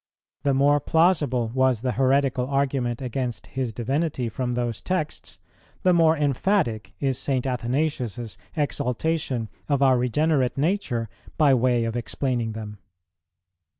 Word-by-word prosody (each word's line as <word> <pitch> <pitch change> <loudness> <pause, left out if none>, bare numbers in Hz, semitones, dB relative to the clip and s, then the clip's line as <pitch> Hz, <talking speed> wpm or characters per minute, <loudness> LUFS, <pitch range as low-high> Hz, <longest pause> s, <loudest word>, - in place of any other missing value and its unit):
The 140 -1 +1
more 145 +2 +4
plausible 145 -8 +2
was 130 -3 +2
the 130 0 0
heretical 130 0 +2
argument 135 -3 -1
against 125 -1 -3
His 130 -3 -2
Divinity 130 +2 -1
from 125 +2 -2
those 120 -2 -2
texts, 180 -5 -3 0.5
the 185 - +5
more 165 -1 +4
emphatic 140 - 0
is 135 -3 0
St. 130 -2 -1
Athanasius's 125 - -2 0.2
exaltation 140 -3 -1 0.2
of 140 -1 +2
our 130 -2 +5
regenerate 135 +1 +1
nature 145 - 0 0.3
by 145 -3 +5
way 125 -1 +2
of 115 0 -3
explaining 120 -1 -2
them. 105 -2 -7
130 Hz, 125 wpm, -24 LUFS, 120-145 Hz, 0.5 s, the